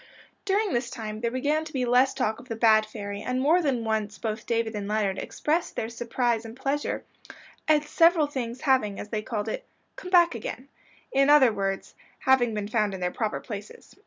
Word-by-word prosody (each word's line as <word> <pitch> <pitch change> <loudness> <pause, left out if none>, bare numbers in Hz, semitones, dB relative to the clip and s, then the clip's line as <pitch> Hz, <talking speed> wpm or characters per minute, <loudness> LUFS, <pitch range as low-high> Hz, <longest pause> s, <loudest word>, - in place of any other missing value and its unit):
During 405 0 +1
this 240 0 -1
time 215 -1 -6
there 235 - +1
began 290 +6 0
to 315 - -9
be 255 -2 0
less 250 +2 +3
talk 220 +1 -1
of 255 - -15
"the 225 - -2
bad 220 -1 +4
fairy," 205 -2 -6
and 250 0 -2
more 315 +7 +4
than 265 -7 0
once 215 -2 -1
both 215 0 -4
David 230 -1 0
and 205 -2 -4
Leonard 205 -2 0
expressed 320 +3 -1
their 220 - -2
surprise 235 0 -1
and 225 +1 -10
pleasure 280 +2 -2 0.6
at 305 -1 +4
several 330 +1 +4
things 255 -4 -5
having, 255 -8 +2
as 205 - -7
they 215 -1 -2
called 215 -1 -3
it, 360 - -3 0.3
"come 365 - -8
back 345 -3 +5
again;" 250 +3 -6 0.4
in 275 +1 +3
other 270 -6 +7
words, 195 -1 -3 0.3
having 260 -3 +4
been 205 -1 -3
found 210 -2 0
in - - -7
their 180 0 -1
proper 220 +1 -2
places. 205 -2 -9
235 Hz, 200 wpm, -26 LUFS, 215-275 Hz, 0.6 s, other